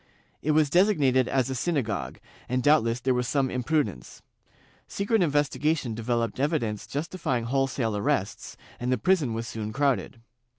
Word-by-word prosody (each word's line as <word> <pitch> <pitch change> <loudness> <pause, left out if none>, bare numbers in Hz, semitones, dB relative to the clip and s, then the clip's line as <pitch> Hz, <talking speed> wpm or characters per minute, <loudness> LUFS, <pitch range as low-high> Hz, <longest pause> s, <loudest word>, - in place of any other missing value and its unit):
It 155 - +1
was 150 -2 +3
designated 145 - +3
as 130 -1 0
a - - -1
syna 145 +2 0
gogue, 105 -3 -4 0.3
and 125 0 0
doubtless 125 -6 +3
there 130 +1 +1
was 125 0 -1
some 135 -1 +1
imprudence. 125 - -2 0.6
Secret 205 +2 0
inves 145 -3 +2
tigation 150 -6 0
developed 115 0 -2
evidence 130 -8 -1
justifjdng 145 -5 -2
wholesale 125 -3 0
arrests, 100 0 -2 0.2
and 125 +1 -1
the 130 - +2
prison 145 - +1
was 115 +1 -4
soon 110 -2 -5
crowded. 135 -2 0
130 Hz, 155 wpm, -26 LUFS, 115-150 Hz, 0.6 s, was